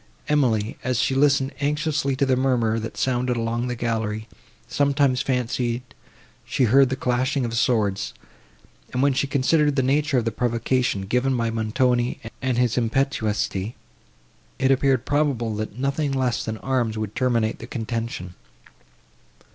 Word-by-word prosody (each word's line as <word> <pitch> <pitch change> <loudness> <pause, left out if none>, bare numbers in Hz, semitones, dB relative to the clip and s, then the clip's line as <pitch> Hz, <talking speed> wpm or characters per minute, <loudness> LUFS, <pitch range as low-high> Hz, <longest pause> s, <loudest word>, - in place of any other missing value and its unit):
Emily, 115 -8 +1
as 125 -1 0
she 125 - +1
listened 135 0 +3
anxiously 145 -1 0
to 140 - +1
the 130 -1 +2
murmur, 120 -4 +1
that 110 0 -6
sounded 125 -1 0
along 115 +1 -1
the 125 - -2
gallery, 110 -2 -2 0.4
sometimes 140 -2 +2
fancied 125 -1 -1 0.6
she - - 0
heard 130 +3 +5
the 130 - -1
clashing 130 +2 0
of 115 - -4
swords, 105 - +1 0.8
and, 125 - 0
when 140 -1 +4
she 140 - 0
considered 145 +2 +2
the 135 - +2
nature 145 +1 +2
of 120 - +1
the 115 - 0
provocation, 120 -1 0
given 125 +6 +1
by 115 -1 0
Montoni, 120 +2 0 0.2
and 130 -2 0
his 125 0 +2
impetuosity, 110 -4 -1 0.8
it 135 0 +2
appeared 130 -2 +2
probable, 140 -7 0
that 110 0 -5
nothing 140 +2 -1
less 130 -4 0
than 110 0 -4
arms 120 -3 -1
would 110 -1 -4
terminate 115 -3 0
the 115 - -8
contention. 115 -6 -4
125 Hz, 145 wpm, -23 LUFS, 115-135 Hz, 0.8 s, heard